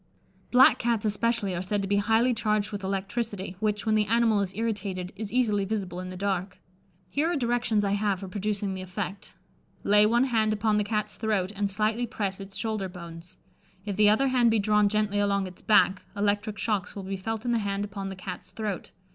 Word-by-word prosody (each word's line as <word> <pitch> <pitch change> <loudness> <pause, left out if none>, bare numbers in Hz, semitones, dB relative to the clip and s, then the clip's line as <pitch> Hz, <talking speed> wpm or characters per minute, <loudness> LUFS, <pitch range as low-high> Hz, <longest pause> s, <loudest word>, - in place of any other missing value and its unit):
Black 255 +1 +6
Cats 230 -3 0
especially 215 -2 0
are 175 - -2
said 200 +2 -1
to - - -2
be 200 +1 +2
highly 225 +4 +3
charged 215 -2 0
with 205 -1 -5
electricity, 195 0 -3
which, 210 0 -1
when 220 - +2
the 215 -1 +2
animal 225 -2 +3
is 190 -2 -2
irritated, 200 -5 -3
is 205 0 -6
easily 220 -5 +2
visible 195 -3 -3
in 185 0 -6
the 185 - -7
dark. 190 -1 -2 0.5
Here 315 +4 0
are - - 0
directions 240 -5 +1
I 200 - 0
have 200 -2 0
for 195 - -6
producing 200 +1 -2
the 190 - -5
effect: 190 +1 -6 0.5
Lay 210 +1 +5
one 235 +3 +3
hand 220 -4 +2
upon 215 0 +1
the - - +2
Cat's 210 0 -2
throat, 210 -4 0
and 200 0 0
slightly 215 +4 0
press 200 -3 -3
its 195 0 -9
shoulder 215 -3 -2
bones. 170 0 -10 0.5
If 200 -2 -3
the 210 +1 +5
other 265 +6 +3
hand 245 -2 +4
be 225 - +3
drawn 210 0 +3
gently 210 -1 0
along 200 -1 +1
its 185 -1 -10
back, 200 -3 +4 0.2
electric 205 +1 0
shocks 210 -4 -1
will 200 - -5
be 195 +1 -3
felt 225 +4 -4
in 240 - +1
the 235 - +2
hand 200 -1 -2
upon 195 -1 -5
the 195 - -6
Cat's 180 -1 -7
throat. 210 -4 -4
205 Hz, 210 wpm, -27 LUFS, 195-220 Hz, 0.5 s, Black